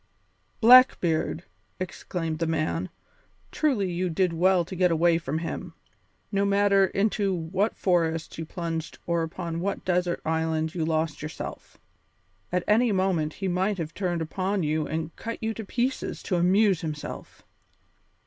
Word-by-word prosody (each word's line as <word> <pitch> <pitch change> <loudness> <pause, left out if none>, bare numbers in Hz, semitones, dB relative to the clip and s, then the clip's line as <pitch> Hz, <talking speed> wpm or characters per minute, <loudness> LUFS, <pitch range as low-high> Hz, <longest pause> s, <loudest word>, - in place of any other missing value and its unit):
"Blackbeard!" 220 -10 +5 0.4
exclaimed 165 -2 -4
the 165 - 0
man. 160 +3 -1 0.6
"Truly 230 - +1
you 180 +1 -1
did 175 +1 +1
well 180 +1 +3
to 185 - -7
get 180 0 +3
away 165 0 +3
from 160 -2 -3
him, 165 +1 -5 0.6
no 200 -1 +1
matter 200 -1 +4
into 200 0 0
what 185 +6 -1
forests 165 -3 0
you - - -2
plunged 165 -2 -4
or 170 -1 +1
upon 165 0 -4
what 200 +3 -3
desert 180 -1 +1
island 160 0 0
you 170 - -1
lost 160 -1 -1
yourself. 155 +1 -7 0.7
At 180 0 0
any 225 +2 +4
moment 185 -6 +1
he 195 - -4
might 190 +3 0
have 165 -2 -4
turned 175 -4 -1
upon 190 +3 -1
you 155 0 0
and 160 +1 -4
cut 230 0 -5
you 225 0 0
to 220 - -6
pieces 245 +5 -2
to 185 - -1
amuse 185 +1 +3
himself. 155 -3 -7
175 Hz, 150 wpm, -26 LUFS, 160-195 Hz, 0.7 s, Blackbeard